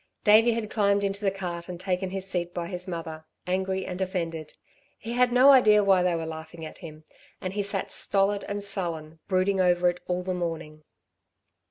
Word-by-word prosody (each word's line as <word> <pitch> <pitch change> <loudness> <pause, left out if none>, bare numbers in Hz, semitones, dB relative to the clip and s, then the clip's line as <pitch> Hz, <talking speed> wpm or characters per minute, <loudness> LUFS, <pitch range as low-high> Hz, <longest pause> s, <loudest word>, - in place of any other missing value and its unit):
Davey 225 +2 +6
had 225 -2 -4
climbed 200 -2 +2
into 200 +1 -2
the 200 - +2
cart 180 -3 -5
and 175 -1 -6
taken 185 0 -2
his 190 0 -4
seat 175 -2 -3
by 175 - -2
his 180 +1 -5
mother, 165 -3 -6 0.2
angry 190 +1 -1
and 180 +1 -5
offended. 165 -4 -3 0.4
He 230 - -6
had 250 0 +3
no 255 +3 +7
idea 215 -6 +6
why 195 -2 +4
they 180 -1 +1
were 165 -1 -3
laughing 160 +1 -8
at 155 - -10
him; 155 -3 -10 0.4
and 185 0 -4
he 205 - -1
sat 200 -1 -3
stolid 200 +1 0
and 205 0 -4
sullen, 165 -5 -4
brooding 190 0 +2
over 180 -1 +3
it 175 - -12
all 180 0 -1
the 185 0 -2
morning. 165 -3 -4
185 Hz, 195 wpm, -26 LUFS, 170-200 Hz, 0.4 s, no